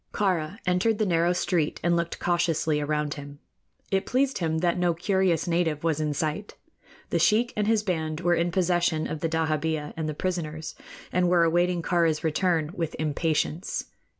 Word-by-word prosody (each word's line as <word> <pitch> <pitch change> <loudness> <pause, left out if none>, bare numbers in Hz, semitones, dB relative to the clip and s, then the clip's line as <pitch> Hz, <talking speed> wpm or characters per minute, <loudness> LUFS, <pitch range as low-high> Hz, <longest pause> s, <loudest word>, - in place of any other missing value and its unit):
Kāra 185 -3 0
entered 180 +5 +2
the 215 - +1
narrow 170 -1 +2
street 175 -3 0
and 170 +1 +3
looked 170 0 -1
cautiously 165 -3 +1
around 150 0 -1
him. 145 0 -9 0.5
It 195 0 0
pleased 270 +1 +1
him 160 -2 0
that 175 +1 +1
no 175 -1 +2
curious 185 -1 +1
native 165 -3 0
was 160 -2 +1
in 150 -1 -1
sight. 155 +7 -3 0.6
The - - +2
sheik 235 +3 +3
and 210 -1 0
his 220 -1 +2
band 160 -4 -2
were 175 -1 +2
in 170 0 +1
possession 175 -3 +1
of 155 - -4
the 165 - -1
dahabeah 155 -1 -1
and 160 -1 -3
the 155 - -4
prisoners, 160 -3 -3 0.4
and 180 0 +2
were 175 -1 +4
awaiting 175 +1 +2
Kāra's 165 -3 +1
return 160 -1 +1
with 165 -4 -3
impatience. 155 +2 -1
170 Hz, 175 wpm, -26 LUFS, 155-180 Hz, 0.6 s, were